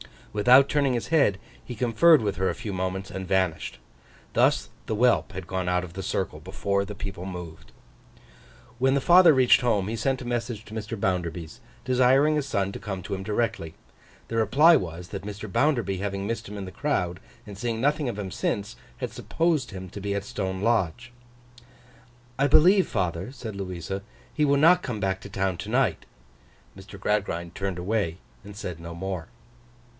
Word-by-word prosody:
Without 125 +6 +6
turning 140 -3 +2
his 120 - -2
head, 140 -12 +3 0.3
he 125 - -7
conferred 125 +7 +5
with 100 -3 -2
her 95 0 +1
a - - -2
few 110 -2 -5
moments, 95 +1 -3
and 95 -1 -5
vanished. 95 -3 0 0.6
Thus - - +2 0.2
the 110 - -2
whelp 120 +2 +2
had 95 -1 -6
gone 95 0 -3
out 90 0 +1
of 85 -2 -9
the 95 - -5
circle - - -2
before 100 0 -1
the 105 +1 -7
people 95 -3 -6
moved. 85 -8 -8 1.1
When 135 +2 +3
the 140 - +1
father 175 +2 +7
reached 130 -2 +5
home, 105 -5 +1
he 115 - -3
sent 135 +2 0
a - - -7
message 120 -2 -3
to 110 - -12
Mr. 110 0 -5
Bounderby's, 90 0 -2 0.2
desiring 130 +4 +4
his 145 -2 -1
son 100 -7 0
to - - -7
come 95 -4 -5
to - - -5
him 95 0 -3
directly. 105 -6 -2 0.5
The 115 - -2
reply 145 +10 +6
was, 90 0 -6
that 100 -2 -6
Mr. 105 0 -7
Bounderby 120 -8 +1
having 100 0 -3
missed 115 +1 -3
him 105 +1 -7
in 100 - -5
the 95 - -8
crowd, 90 -12 -1 0.3
and 100 -2 -9
seeing 115 0 -2
nothing 145 +1 +1
of 115 - -5
him 100 -3 -5
since, 100 +4 -2 0.2
had - - -4
supposed 165 -5 0
him 95 -2 -8
to 100 - -8
be 100 0 -2
at 100 - -2
Stone 95 -2 -4
Lodge. 115 +1 0 1.3
'I 140 - +4
believe, 180 +7 +6
father,' 95 +3 -2
said 115 -6 -7
Louisa, 95 0 -5 0.3
'he 150 - +2
will 140 0 +3
not 175 +5 +6
come 115 - -4
back 95 -1 0
to - - -9
town 95 -2 -1
to - - -6
night.' - - +1 0.7
Mr. 95 +1 -12
Gradgrind 95 -5 -1
turned 95 -1 -3
away, 90 -2 -1 0.3
and 100 0 -10
said 90 -5 -6
no 85 0 -8
more. 95 -1 -4
100 Hz, 190 wpm, -26 LUFS, 95-125 Hz, 1.3 s, father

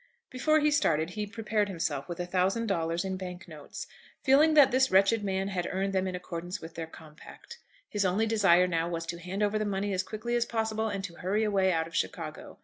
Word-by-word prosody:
Before 310 +5 +2
he 300 0 +3
started 165 - +2
he 210 +1 -4
prepared 215 -1 -1
himself 165 -5 -3
with 175 - -5
a 175 - -1
thousand 190 +5 +1
dollars 170 -3 -1
in 190 0 -2
bank 185 0 -7
notes, 155 -3 -8 0.4
feeling 295 +4 +5
that 290 -3 +7
this 260 +1 +3
wretched 195 +3 +4
man 195 0 -1
had 180 -3 -2
earned 195 +1 -1
them 190 0 +1
in 185 - -3
accordance 180 +1 -5
with 165 0 -10
their 165 -1 -5
compact. 160 - -13 0.3
His 205 - -1
only 195 +4 +2
desire 195 -5 +4
now 170 -1 -1
was 165 -1 -3
to 170 +1 -5
hand 185 +4 -3
over 210 +1 +1
the - - 0
money 200 0 -1
as 185 - +1
quickly 220 +5 -4
as 240 0 +1
possible, 220 -1 -1
and 200 -2 -4
to 170 -3 -7
hurry 200 +4 0
away 195 -3 +2
out 160 -2 +1
of 165 - -12
Chicago. - - -4
190 Hz, 225 wpm, -29 LUFS, 175-215 Hz, 0.4 s, that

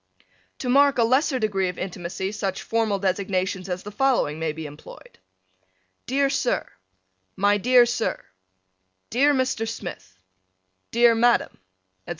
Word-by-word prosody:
To 255 - -5
mark 280 +2 +4
a 235 - +4
lesser 260 +4 +2
degree 195 -5 0
of 180 - -7
intimacy 185 +1 -4
such 200 -3 -3
formal 225 -3 0
designations 190 -1 -2
as 180 0 -4
the 210 - -8
following 225 - +1
may 160 -1 -1
be 160 +1 -7
employed: 150 0 -13 0.9
Dear 275 +2 +2
Sir: 270 -2 -1 0.7
My 205 +1 +3
dear 245 +3 +5
Sir: 240 -1 -2 0.9
Dear 275 +5 +4
Mr. 255 -4 -1
Smith: 175 - -8 0.7
Dear 235 0 +5
Madam: 235 +1 +3
etc. 95 0 -24
205 Hz, 135 wpm, -24 LUFS, 180-245 Hz, 0.9 s, dear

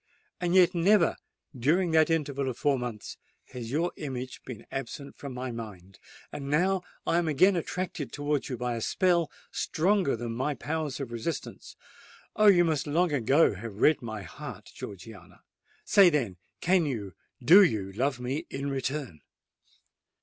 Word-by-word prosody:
And 175 0 0
yet 180 -1 +6
never—during 170 - +1
that 160 0 +4
interval 140 -4 0
of 125 - -5
four 140 -3 +1
months—has 120 0 -8
your 165 +7 0
image 130 -3 -6
been 120 -5 -9
absent 140 +1 -6
from 140 - -8
my 125 0 -5
mind: 100 -5 -9 0.3
and 140 -1 -6
now 185 +6 +2 0.2
I 170 - +2
am 170 - -1
again 185 +6 +4
attracted 175 -3 -3
towards 145 -1 -2
you 125 - -3
by 125 0 -2
a 115 - -4
spell 175 - +2 0.2
stronger 185 -3 +1
than 115 0 -5
my 130 +5 -2
powers 150 +1 -3
of 135 -4 -5
resistance. 120 +8 -5 0.6
Oh! 215 - +4
you 175 -4 +7
must 155 -3 0
long 170 +3 +2
ago 135 +2 +3
have 100 +2 -8
read 150 +8 +3
my 110 -4 -6
heart, 80 - -9
Georgiana:—say, 100 - -1
then—can 150 - 0
you, 105 -9 -4 0.3
do 170 +11 +8
you 105 - +1
love 130 +5 -1
me 135 +7 -3
in 140 +1 -4
return?" 135 - -4
140 Hz, 150 wpm, -28 LUFS, 120-165 Hz, 0.6 s, do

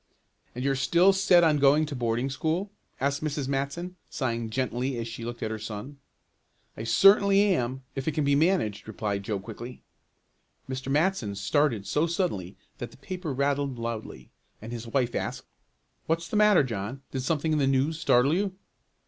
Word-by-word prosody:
"And 125 - -4
you're 135 0 +2
still 175 +8 +4
set 190 -2 +5
on 155 -3 +4
going 145 +3 +5
to 150 -2 -6
boarding 120 +2 -1
school?" 165 +9 -1 0.3
asked 140 +2 -1
Mrs. 145 -3 -2
Matson, 140 +7 -3
sighing 115 -4 -2
gently 130 +2 -2
as 115 0 -3
she 115 0 -7
looked 120 0 -5
at 110 - -2
her 110 - -4
son. 110 +6 -7 0.8
"I 110 - -6
certainly 195 - +6
am 130 -3 -2
if 135 +1 -5
it 160 - +1
can 150 - 0
be 140 0 +2
managed," 145 - +1
replied 105 -2 -3
Joe 100 0 -3
quickly. 120 +6 -9 0.8
Mr. 130 +1 -4
Matson 150 - +1
started 105 +2 +1
so 150 +9 +1
suddenly 100 - -2 0.2
that 120 - -5
the - - -17
paper 180 +2 -5
rattled 140 -1 0
loudly, 115 - -6 0.3
and 110 +2 -9
his 120 -1 -6
wife 125 0 0
asked: - - -3 0.6
"What's 165 +1 0
the - - -5
matter, 210 -6 +5
John, 120 +2 -5
did 130 - -2
something 155 +3 0
in 155 - +2
the 135 - +2
news 135 +4 +1
startle 135 -3 +3
you?" 190 +1 0
135 Hz, 175 wpm, -27 LUFS, 115-160 Hz, 0.8 s, certainly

